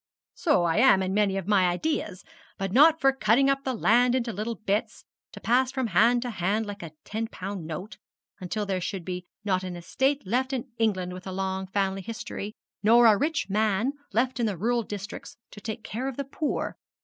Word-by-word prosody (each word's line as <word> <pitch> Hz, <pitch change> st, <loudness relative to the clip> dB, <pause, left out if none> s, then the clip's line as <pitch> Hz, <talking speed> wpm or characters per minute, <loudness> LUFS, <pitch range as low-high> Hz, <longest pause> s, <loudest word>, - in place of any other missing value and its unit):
'So 295 Hz, -, +2 dB
I 170 Hz, +1 st, +1 dB
am 220 Hz, -5 st, +5 dB
in 185 Hz, 0 st, -2 dB
many 200 Hz, -1 st, +2 dB
of 195 Hz, -1 st, -4 dB
my 195 Hz, -3 st, +4 dB
ideas, 195 Hz, -, -2 dB, 0.3 s
but 195 Hz, -1 st, -3 dB
not 310 Hz, +8 st, +6 dB
for 270 Hz, -2 st, +4 dB
cutting 265 Hz, +3 st, +3 dB
up 275 Hz, 0 st, -1 dB
the 260 Hz, -2 st, -2 dB
land 245 Hz, +3 st, +4 dB
into 235 Hz, -3 st, -1 dB
little 220 Hz, +4 st, -3 dB
bits, 205 Hz, 0 st, -2 dB, 0.3 s
to -, -, -10 dB
pass 255 Hz, +2 st, +2 dB
from 260 Hz, -1 st, -1 dB
hand 235 Hz, +5 st, +4 dB
to 245 Hz, -, -3 dB
hand 205 Hz, +3 st, 0 dB
like 205 Hz, -1 st, -7 dB
a 165 Hz, -3 st, -8 dB
ten 225 Hz, +2 st, -3 dB
pound 190 Hz, -5 st, -6 dB
note, 180 Hz, +7 st, -7 dB, 0.4 s
until 205 Hz, +3 st, -3 dB
there 190 Hz, -2 st, -2 dB
should 185 Hz, +1 st, -3 dB, 0.4 s
not 185 Hz, -2 st, +1 dB
be 185 Hz, -, -5 dB
an 180 Hz, -, -5 dB
estate 265 Hz, +10 st, -1 dB
left 255 Hz, +7 st, 0 dB
in 260 Hz, 0 st, -4 dB
England 185 Hz, -5 st, 0 dB
with 185 Hz, +1 st, -9 dB
a -, -, -4 dB
long 190 Hz, 0 st, -3 dB
family 195 Hz, 0 st, -1 dB
history, 215 Hz, -1 st, -6 dB, 0.3 s
nor 235 Hz, +3 st, +6 dB
a 220 Hz, -2 st, +7 dB
rich 315 Hz, +9 st, 0 dB
man 215 Hz, +5 st, +1 dB, 0.2 s
left 250 Hz, +4 st, 0 dB
in 235 Hz, -, +2 dB
the 200 Hz, -4 st, -2 dB
rural 235 Hz, +6 st, +1 dB
districts 205 Hz, -2 st, -7 dB
to 205 Hz, -, -11 dB
take 220 Hz, +1 st, -5 dB
care 240 Hz, +5 st, -4 dB
of 270 Hz, -, -5 dB
the 280 Hz, -, -1 dB
poor. 290 Hz, +2 st, -3 dB
215 Hz, 210 wpm, -27 LUFS, 190-245 Hz, 0.4 s, a